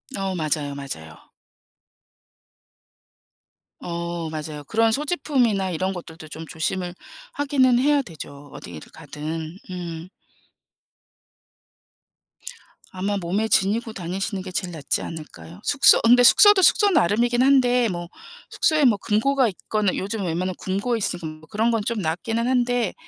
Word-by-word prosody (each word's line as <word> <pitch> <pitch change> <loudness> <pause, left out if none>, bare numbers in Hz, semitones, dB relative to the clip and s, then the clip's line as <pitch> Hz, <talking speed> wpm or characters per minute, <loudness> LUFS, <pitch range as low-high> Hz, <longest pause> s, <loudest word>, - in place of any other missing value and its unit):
어 195 -1 -2
맞아요, 150 -3 -2
맞아요. 80 - -9 2.5
어 170 -1 -4
맞아요. 150 -1 -6
그런 225 0 +2
소지품이나 255 - 0
이런 185 +3 -2
것들도 165 -3 -10
좀 160 +1 -9
조심을 175 +3 -3 0.4
하기는 270 -4 +2
해야 290 +2 +3
되죠, 145 - -11
어디를 80 -3 -10
가든. 160 +2 -7
음. 170 -2 -7 2.8
아마 195 +2 -2
몸에 195 +4 -1
지니고 220 +3 +1
다니시는 190 +2 -4
게 185 - -8
제일 180 0 -3
낫지 155 -4 -2
않을까요? 165 +2 -9
숙소 280 - +6
그런데 245 +2 +6
숙소도 410 - +7
숙소 410 +3 +5
나름이긴 240 - +2
한데 250 -3 +3
뭐 175 -2 -5 0.4
숙소에 310 -2 +2
뭐 230 -5 +4
금고가 250 +7 +1
있거나 205 +1 -2
요즘 205 +3 -3
웬만하면 180 +2 -2
금고 200 +6 -1
있으니 195 -5 -1 0.2
뭐 - - -23
그런 225 +3 +1
건 230 - +1
좀 235 -2 -1
낫기는 205 +7 -2
한데 245 -3 +1
195 Hz, 280 characters per minute, -23 LUFS, 165-240 Hz, 2.8 s, 숙소도